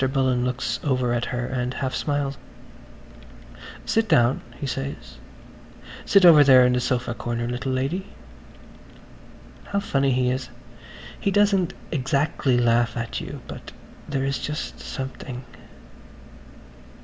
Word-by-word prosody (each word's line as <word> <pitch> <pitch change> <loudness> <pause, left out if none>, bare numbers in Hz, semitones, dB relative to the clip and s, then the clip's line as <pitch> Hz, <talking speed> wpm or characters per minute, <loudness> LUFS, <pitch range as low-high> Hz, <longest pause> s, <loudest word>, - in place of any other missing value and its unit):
Bullen 130 -2 +1
looks 125 +1 -2
over 130 -4 +1
at 120 0 0
her 125 -1 -3
and 125 0 -3
half 130 -1 -2
smiles. 145 -2 -1 1.5
"Sit 225 -1 +1
down," 130 -5 +4 0.2
he - - -4
says. 135 - -5 0.9
"Sit 200 -2 +5
over 155 -4 +9
there 130 -2 +7
in 125 - +3
the 125 - +2
sofa 120 -1 -1
corner, 120 0 -3
little 125 +2 -3
lady." 140 +10 -2 1.6
How 200 - -1
funny 140 -8 +1
he 125 0 +2
is. 130 0 -3 0.7
He - - 0
doesn't 195 -3 +2 0.2
exactly 140 -2 +1
laugh 120 0 +2
at 115 -1 -3
you... - - -7
but - - -9 0.4
there 135 -2 -1
is 140 0 -1
just 150 0 -5
something. 130 -2 -6
130 Hz, 125 wpm, -24 LUFS, 125-145 Hz, 1.6 s, over